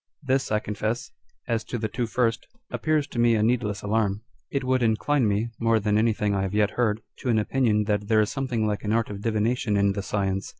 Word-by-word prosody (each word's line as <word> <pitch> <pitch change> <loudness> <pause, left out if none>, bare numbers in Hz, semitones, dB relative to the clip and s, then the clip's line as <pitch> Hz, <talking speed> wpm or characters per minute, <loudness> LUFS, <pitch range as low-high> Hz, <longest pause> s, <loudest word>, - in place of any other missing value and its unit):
This, 135 -2 0
I 105 - +3
confess, 110 +7 -3 0.4
as 115 -2 0
to 120 - -4
the 110 -1 -2
two 115 +2 -2
first, 115 0 0 0.2
appears 155 -2 +1
to 125 - -6
me 120 -1 +4
a 105 - +2
needless 110 -3 0
alarm. 105 -1 0 0.3
It 140 -1 -2
would 130 0 +1
incline 120 +3 +2
me 105 +3 0
(more 115 -1 +3
than 105 0 0
anything 110 -1 +2
I 100 - 0
have 95 +1 -2
yet 105 -1 +3
heard) 110 -3 0 0.2
to 125 - -4
an 115 - +3
opinion 110 -1 +2
that 105 -1 -1
there 110 0 +4
is 105 - 0
something 130 -5 -1
like 105 -1 -2
an 105 0 0
art 115 -2 0
of 100 -1 -6
divination 110 0 0
in 100 0 +3
the 100 - -3
science. 95 -1 -2
110 Hz, 225 wpm, -25 LUFS, 105-120 Hz, 0.4 s, me